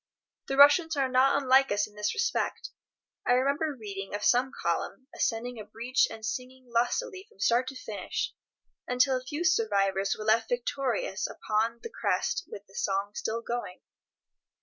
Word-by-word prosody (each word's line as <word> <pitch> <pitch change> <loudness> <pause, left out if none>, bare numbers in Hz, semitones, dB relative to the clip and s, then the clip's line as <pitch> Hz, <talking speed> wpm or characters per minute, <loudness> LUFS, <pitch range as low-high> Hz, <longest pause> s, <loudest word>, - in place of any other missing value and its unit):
The 270 - -2
Russians 290 +3 +6
are 270 -1 +2
not 260 +2 +4
unlike 270 0 +4
us 205 0 +2
in 210 - -16
this 210 0 -2
respect. 485 0 -1 0.5
I 245 - +3
remember 280 +3 +1
reading 200 -2 -6
of 205 - -4
some 250 +2 +3
column 170 +8 -2
ascending 240 +1 -2
a - - -6
breach 230 +5 +1
and 220 -1 -8
singing 255 +3 -5
lustily 380 - 0
from - - -25
start 240 +5 +2
to 270 - -6
finish, - - -4 0.5
until 255 +2 +3
a 255 - -3
few 295 +6 -4
survivors 200 - +2
were 215 - -6
left 220 +1 +3
victorious 245 -5 -1
upon 225 +2 -1
the 460 - -6
crest 465 - -1
with 200 - -8
the 195 - -22
song 195 +1 -1
still 230 +2 -3
going. 240 -7 -4
245 Hz, 165 wpm, -29 LUFS, 215-270 Hz, 0.5 s, Russians